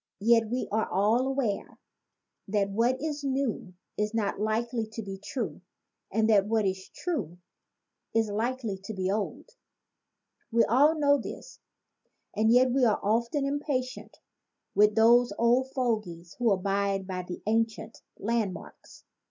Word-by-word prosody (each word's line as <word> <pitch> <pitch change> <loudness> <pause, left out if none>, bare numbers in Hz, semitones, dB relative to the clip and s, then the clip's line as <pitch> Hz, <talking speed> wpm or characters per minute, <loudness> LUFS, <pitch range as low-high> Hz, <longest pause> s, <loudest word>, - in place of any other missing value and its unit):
Yet 230 0 +4
we 250 +2 -2
are 220 +1 0
all 215 +7 +2
aware 265 -7 -2 0.7
that 200 -1 0
what 235 +5 +1
is 300 -1 -4
new 265 -9 -2 0.2
is 210 +1 -1
not 205 -3 -1
likely 225 +2 -1
to 225 - -5
be 195 -1 -7
true 200 - -4 0.5
and 220 +2 +2
that 205 -3 +4
what 220 -1 +1
is 190 0 -3
true 215 - -4 0.8
is 225 -1 +3
likely 225 -1 -2
to 220 - -6
be 190 0 -1
old. 205 0 -3 1.1
We 230 0 +4
all 290 +7 +4
know 285 -1 +4
this, - - -9 0.8
and 220 +1 +3
yet 250 +1 +5
we 265 +1 +2
are 220 -4 +3
often 235 +7 +1
impatient 275 -3 -3 0.6
with 210 0 +4
those 235 0 +5
old 245 +3 +3
fogies 215 -10 -3
who 235 -3 +3
abide 195 0 0
by 185 -1 -4
the 180 0 -8
ancient 225 +1 -1 0.2
land 220 -2 0
marks. - - -13
225 Hz, 145 wpm, -28 LUFS, 200-250 Hz, 1.1 s, yet